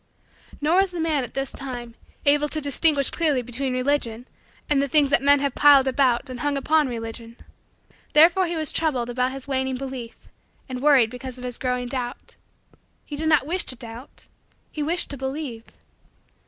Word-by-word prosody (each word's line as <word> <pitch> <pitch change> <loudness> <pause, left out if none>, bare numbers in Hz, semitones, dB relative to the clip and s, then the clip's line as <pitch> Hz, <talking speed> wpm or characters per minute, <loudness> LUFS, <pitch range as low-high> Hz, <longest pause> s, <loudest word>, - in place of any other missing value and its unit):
Nor 315 +5 +2
was 385 0 +3
the 355 -1 -6
man, 315 -4 0
at 245 - -8
this 270 0 -2
time, 245 -4 -7 0.3
able 295 +1 +3
to 310 - -3
distinguish 285 0 +2
clearly 300 -7 +1
between 250 +3 -3
Religion 255 -2 -1 0.4
and 285 -2 +2
the 280 - 0
things 285 0 +3
that - - +4
men 285 0 +4
have 280 -2 -1
piled 280 -2 +6
about 260 -1 +1
and 255 -1 -6
hung 290 +1 -1
upon 305 +2 +2
Religion. 230 0 -7 0.8
Therefore 340 +4 +6
was 320 -3 -1
he - - -2
troubled 260 -7 -1
about 250 +1 0
his 270 0 -8
waning 265 -1 -1
belief 255 -3 -8 0.4
and 255 -2 -6
worried 270 -6 +4
because 255 0 -7
of 250 - -10
his 245 -1 -5
growing 250 -1 -1
doubt. 245 -1 -6 0.7
He 295 - -7
did 315 +2 -1
not 300 -4 +3
wish 355 +5 -1
to 255 - -3
doubt; 235 +2 -11 0.5
he 305 - -5
wished 330 +3 0
to 280 - -6
believe. 265 -3 -5
270 Hz, 180 wpm, -23 LUFS, 250-295 Hz, 0.8 s, piled